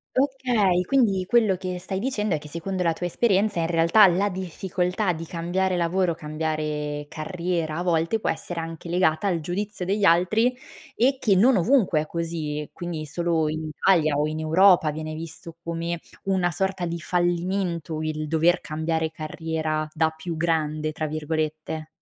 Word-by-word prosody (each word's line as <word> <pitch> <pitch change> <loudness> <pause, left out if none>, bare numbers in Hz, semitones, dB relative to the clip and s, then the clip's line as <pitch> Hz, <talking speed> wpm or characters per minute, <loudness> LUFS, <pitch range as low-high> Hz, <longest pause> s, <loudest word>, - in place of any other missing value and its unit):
Okay, 250 -9 +2
quindi 220 -9 +3
quello 220 -5 +4
che 185 0 -4
stai 190 +2 -3
dicendo 215 -5 -1
è 155 - 0
che 150 - -11
secondo 180 +4 -3
la 165 -2 +2
tua 175 - -5
esperienza 200 0 +1
in 165 - +1
realtà 170 +5 +6
la 190 +3 +2
difficoltà 180 +1 -2
di 165 0 -6
cambiare 180 +3 -1
lavoro, 175 0 +1
cambiare 150 -1 -3
carriera 165 0 -3
a 175 - -2
volte 170 +4 +1
può - - -2
essere 175 -1 -5
anche 165 +1 -6
legata 175 +1 +2
al 175 -3 +1
giudizio 185 +4 -4
degli 200 +2 0
altri, 215 +9 +3 0.4
e 265 +3 +3
che 210 -7 +3
non 235 +5 +5
ovunque 185 - +3
è 155 - -6
così. 160 -3 -3
Quindi 170 -3 -5
solo 165 0 0
in 155 0 -3
Italia 155 -3 +3
o 150 - +2
in 155 0 -4
Europa 165 +1 +5
viene 155 +1 -5
visto 165 +1 -8
come 170 0 -3 0.2
una 190 -2 +1
sorta 190 0 -1
di 170 0 -3
fallimento, 175 -1 -1
il 155 -1 -3
dover 165 +3 +3
cambiare 160 +1 -2
carriera 155 0 -3
"da 160 0 +2
più 160 +2 -6
grande", 155 -1 0
tra 155 0 -3
virgolette. 155 0 -3
170 Hz, 165 wpm, -25 LUFS, 155-190 Hz, 0.4 s, realtà